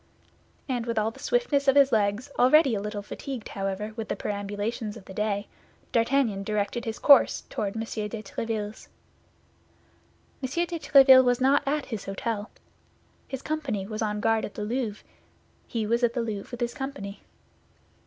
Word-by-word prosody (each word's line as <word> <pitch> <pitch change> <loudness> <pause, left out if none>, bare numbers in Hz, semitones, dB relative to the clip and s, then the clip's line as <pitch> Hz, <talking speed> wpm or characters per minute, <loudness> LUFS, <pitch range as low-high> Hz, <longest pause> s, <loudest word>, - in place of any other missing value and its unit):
And 245 -3 -2
with 230 -1 -2
all 215 +1 +1
the - - -16
swiftness 295 - +1
of 270 - +5
his 280 -1 +6
legs, 215 +3 +1
already 270 +1 +6
a 200 - -1
little 210 0 -4
fatigued, 255 +2 -6
however, 195 +2 -3
with 225 -2 -5
the - - -1
perambulations 205 +2 -3
of 200 - -13
the 190 - -10
day, 205 0 -1 0.4
D'Artagnan 230 -3 +2
directed 210 +3 -2
his 225 -1 -3
course 280 -2 +6
toward 200 -1 -2
M. 225 - -2
de 215 -1 -5
Tréville's. 215 0 -4 1.5
M. 260 - -2 0.2
de 340 -1 -5
Tréville 265 -3 +7
was 245 -1 +2
not 270 +2 +4
at 295 0 0
his 220 -5 -6
hôtel. 205 +2 -3 0.8
His 265 -1 -6
company 280 -11 -2
was 215 +2 -5
on 210 -1 -1
guard 225 0 +2
at - - -6
the 210 - -4
Louvre; 225 -1 -3 0.6
he 225 -2 -2
was 235 +3 +1
at 235 -1 +3
the 245 - -1
Louvre 210 -3 -5
with 245 -1 -8
his 240 0 -1
company. 270 -8 -6
225 Hz, 170 wpm, -27 LUFS, 210-260 Hz, 1.5 s, Tréville